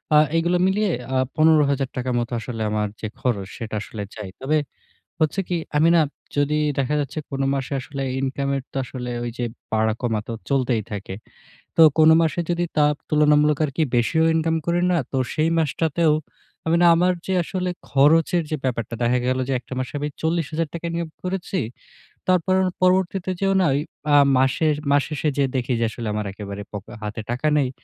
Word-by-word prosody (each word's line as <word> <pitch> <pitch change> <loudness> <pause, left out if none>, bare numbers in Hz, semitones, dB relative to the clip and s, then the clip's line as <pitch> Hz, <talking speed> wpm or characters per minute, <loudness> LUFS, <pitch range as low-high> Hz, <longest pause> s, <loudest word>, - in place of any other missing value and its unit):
আ - - +8 0.2
এইগুলো 175 +2 +2
মিলিয়ে 200 +1 +1 0.2
আ - - +3 0.2
১৫,০০০ 145 -4 +3
টাকার 125 0 -1
মতো 120 +1 -3
আসলে 115 0 -5
আমার 105 -1 0
যে 110 - -2
খরচ 105 -7 -1
সেটা 110 -2 -5
আসলে 105 -1 -6
যায়। 105 -3 -7
তবে 150 +4 +1 0.6
হচ্ছে 160 +5 +1
কি, 175 - 0 0.2
আমি 160 +2 +5
না 165 - +6 0.4
যদি 145 +1 +2 0.2
দেখা 140 +3 0
যাচ্ছে 145 +2 -4
কোন 135 - -2
মাসে 135 +1 -3
আসলে 140 +2 -6 0.2
ইনকাম 135 +1 -2
এর - - -4
তো - - -24
আসলে 125 -1 -6 0.2
ঐযে 120 +1 -4 0.3
বাড়া 110 0 +2
কমাতে 115 -2 -2 0.2
চলতেই 125 -5 +1
থাকে। 100 -2 -5 0.6
তো - - +7 0.2
কোন 155 0 +7
মাসে 165 +2 0
যদি 175 0 0
তাপ 150 0 +4
তুলনামূলক 150 -1 +4
আরকি 150 +3 -1
বেশিও 160 +7 +2
ইনকাম 160 0 +1
করি 175 +1 +1
না, 175 - +3
তো 135 - -1 0.2
সেই 155 +1 +1
মাসটাতেও 160 +1 +1 0.5
আমি 165 - +3
না - - +7
আমার 180 +2 +3
যে 190 - 0
আসলে 185 +1 -3 0.2
খরচের 165 +5 +4
যে - - +1
ব্যাপারটা। 115 -2 -2
দেখা 125 +1 +2
গেল 130 0 +1
যে - - +1
১ - - -21
টা - - -4
মাসে 130 - -4
আমি 150 +1 -2
৪০,০০০ 160 -1 -1
টাকা 170 0 -5
ইনকাম 170 -1 -3
করেছি। 185 +1 -2 0.7
তারপর 185 +1 +3 0.3
পরবর্তীতে 185 0 +2
যেয়েও 195 0 +2
না - - +3
ওই 140 - +1 0.3
আ - - +7 0.2
মাসের 145 +4 +2 0.2
মাস 145 0 +4
শেষে 150 0 -1
যেয়ে 135 -2 +2
দেখি 125 0 -1
যে 115 - +2
আসলে 115 -1 -6
আমার 105 0 -2
একেবারে 100 0 -7
পকে 105 +2 -8
হাতে 105 +1 -4
টাকা 130 +5 -1
নেই। 135 -3 +2
145 Hz, 185 wpm, -23 LUFS, 125-165 Hz, 0.7 s, আ